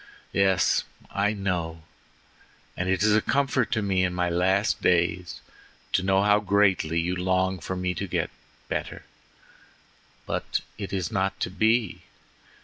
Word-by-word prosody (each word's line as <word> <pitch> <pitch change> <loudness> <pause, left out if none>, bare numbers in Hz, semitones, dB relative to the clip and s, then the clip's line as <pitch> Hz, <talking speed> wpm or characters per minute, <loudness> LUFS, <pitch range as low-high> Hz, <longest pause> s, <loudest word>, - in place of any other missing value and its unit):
"Yes, 95 -1 +3 0.3
I 105 +1 +1
know, 85 -5 -3 0.9
and 90 +1 -2
it 95 +1 +1
is 105 -1 +4
a 110 - +4
comfort 135 -2 +1
to 110 -2 0
me 95 -2 +1
in 90 -1 0
my 90 -1 0
last 95 +4 +1
days 90 0 +1 0.5
to - - +2
know 95 +1 +2
how 105 0 +4
greatly 95 -5 +2
you 90 +2 -1
long 95 +1 0
for 95 +3 -4
me 90 0 -1
to - - -4
get - - -1 0.4
better, - - -4 1.2
but - - -2 0.2
it 100 - -5
is 95 -3 -2
not 95 0 -1
to - - -1
be. 110 0 +1
95 Hz, 145 wpm, -26 LUFS, 90-100 Hz, 1.2 s, is